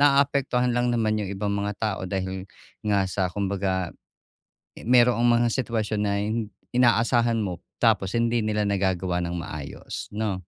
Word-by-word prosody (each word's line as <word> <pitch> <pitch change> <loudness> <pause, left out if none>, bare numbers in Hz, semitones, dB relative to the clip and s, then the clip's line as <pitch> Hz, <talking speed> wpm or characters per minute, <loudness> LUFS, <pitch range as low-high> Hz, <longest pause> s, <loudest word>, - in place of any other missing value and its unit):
naapektuhan 140 -3 +3
lang 120 0 +2
naman 110 -2 +1
yung 100 - -4
ibang 100 +1 -2
mga 100 0 -1
tao 110 -3 -1
dahil 95 0 -4 0.3
nga 100 -2 +2
sa 95 -1 -1
kumbaga 95 -2 -1 0.9
mayro'ng 120 -1 +5
mga 120 0 +4
sitwasyon 110 -4 -1
na 100 -1 +1
hin 110 +2 -1 0.3
inaasahan 120 -1 +3
mo 90 -5 -3 0.2
tapos 95 -1 +3
hindi 115 -1 +1
nila 105 -1 0
nagagawa 95 -3 0
ng 85 +1 -3
maayos, 75 -4 -7
no. 105 -2 -2
105 Hz, 145 wpm, -25 LUFS, 95-120 Hz, 0.9 s, mayro'ng